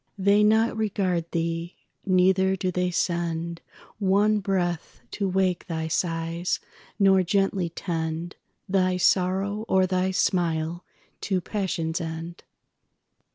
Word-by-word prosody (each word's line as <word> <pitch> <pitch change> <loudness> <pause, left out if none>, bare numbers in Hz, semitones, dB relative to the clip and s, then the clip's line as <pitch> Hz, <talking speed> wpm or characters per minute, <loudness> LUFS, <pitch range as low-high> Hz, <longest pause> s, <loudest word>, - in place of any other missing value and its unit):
They 200 +2 +4
not 220 +2 +3
regard 190 -6 -1
thee, 165 +1 -2 0.3
neither 190 +1 +3
do 185 -1 -2
they 180 0 0
sendOne 175 +5 -1
breath 175 -4 -2
to 200 -2 -1
wake 185 0 0
thy 160 -2 -3
sighs, 165 +1 -1 0.4
nor 195 -1 +5
gently 195 -1 +1
tendThy 175 +3 -3
sorrow 195 +4 +1
or 190 0 +3
thy 185 0 0
smile 170 -2 0 0.4
to 190 -2 0
passion's 180 -4 -2
end. 165 +1 -6
185 Hz, 105 wpm, -25 LUFS, 170-195 Hz, 0.4 s, nor